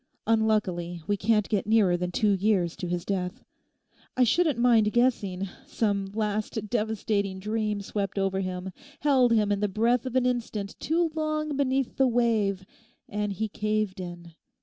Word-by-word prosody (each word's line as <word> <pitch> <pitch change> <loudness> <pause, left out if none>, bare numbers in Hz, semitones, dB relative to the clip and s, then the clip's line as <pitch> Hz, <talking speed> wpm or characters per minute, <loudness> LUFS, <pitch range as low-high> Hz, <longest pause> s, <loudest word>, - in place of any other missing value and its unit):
Unluckily 205 -7 0
we 205 - +1
can't 210 +1 +1
get 205 -2 -1
nearer 210 -5 +4
than 180 0 -2
two 210 +3 +2
years 195 -3 +1
to 185 -3 -5
his 175 0 -3
death. 190 +4 -3 0.7
I 255 - +5
shouldn't 310 +2 +2
mind 230 -3 +4
guessing 200 -6 +1 0.2
some 205 -8 0
last 215 0 -2
devastating 210 -3 -1
dream 210 +1 -2
swept 200 0 -3
over 195 -1 0
him, 185 0 -4 0.3
held 265 -4 +4
him 215 -3 +3
the 205 0 +1
breath 235 +5 +1
of 255 - -5
an 255 -1 +3
instant 225 -5 -2
too 330 +1 +1
long 310 -1 -1
beneath 270 -2 0
the 265 - +4
wave, 220 -6 +1 0.4
and 210 0 -2
he 220 +3 -2
caved 215 -2 -2
in. 175 -2 -8
210 Hz, 155 wpm, -27 LUFS, 195-235 Hz, 0.7 s, I